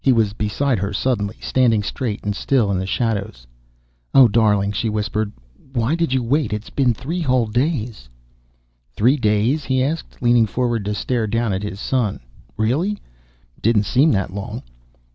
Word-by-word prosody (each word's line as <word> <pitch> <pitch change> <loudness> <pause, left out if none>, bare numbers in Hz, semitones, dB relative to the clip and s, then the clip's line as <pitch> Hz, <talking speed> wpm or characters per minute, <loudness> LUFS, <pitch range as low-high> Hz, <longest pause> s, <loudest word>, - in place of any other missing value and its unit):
He 135 - +4
was 110 -4 +2
beside 110 +4 0
her 100 +2 -2
suddenly, 105 -2 -1
standing 115 -5 +2
straight 110 0 -3
and 105 -1 -2
still 115 -3 +1
in 95 -1 0
shadows. 100 - -2 0.7
"Oh, 135 -2 +9
darling," 105 -3 +2
she 110 +2 -1
whispered. 105 0 -2 0.4
"Why 120 +3 +1
did 165 -3 0
you 130 -1 +1
wait? 130 0 0
It's 105 +1 -5
been 125 -4 +2
three 165 +10 -4
whole 130 -6 +2
days." 120 - -2 0.9
"Three 125 +6 +4
days?" 120 +4 +1
he 130 -1 +1
asked, 155 +4 -4
leaning 120 -2 +4
forward 120 -1 -1
to 105 +1 -2
stare 115 +1 -1
down 115 -1 0
at 95 - -2
his 105 -2 -5
son. 115 -4 -1 0.4
"Really! 135 - +1
It - - -20
didn't 110 -2 +3
seem 135 +9 +3
that 95 -3 -1
long." 100 0 -6
115 Hz, 165 wpm, -20 LUFS, 105-130 Hz, 0.9 s, Oh